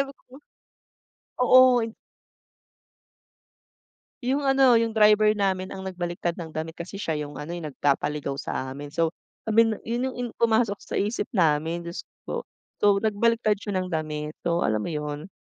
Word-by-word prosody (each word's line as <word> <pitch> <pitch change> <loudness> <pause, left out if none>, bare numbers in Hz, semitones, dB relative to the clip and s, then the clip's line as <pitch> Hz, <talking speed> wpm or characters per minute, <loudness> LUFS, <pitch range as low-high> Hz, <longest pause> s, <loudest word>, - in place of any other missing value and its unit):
sabi 275 0 -2
ko. - - -34 1.2
Oo, 255 -1 +7
in 225 0 -7 2.3
'Yong 270 +4 0
ano, 270 -3 +5
'yong 230 -1 -1
driver 210 -1 +5
namin 190 -2 -1
ang 190 - -7
nagbaliktad 175 -2 -3
ng 160 -3 -7
damit 160 +1 -4
kasi 170 +3 -7
siya 160 -6 -1
'yong 145 0 -10
ano, 150 +2 -7
eh, 175 - -4
'yong 165 - -6
nagpapaligaw 145 0 0
sa 130 -2 -4
amin. 145 +2 -8
So, 165 -1 +2 0.4
I - - +1
mean, 225 0 +4
'yon 240 +3 -2
'yong - - -11
in 245 - -2
pumasok 225 -3 +2
sa - - -9
isip 210 +4 0
namin, 165 -1 +2
Diyos 170 - -6
ko - - -95 0.2
po. - - -2 0.4
So, - - +2 0.2
nagbaliktad 220 0 +2
siya 205 0 -5
ng 185 - -4
damit, 155 -2 -3
so, 170 0 +1
alam 110 0 +1
mo - - -3
'yon? 150 +1 -4
185 Hz, 170 wpm, -25 LUFS, 155-225 Hz, 2.3 s, Oo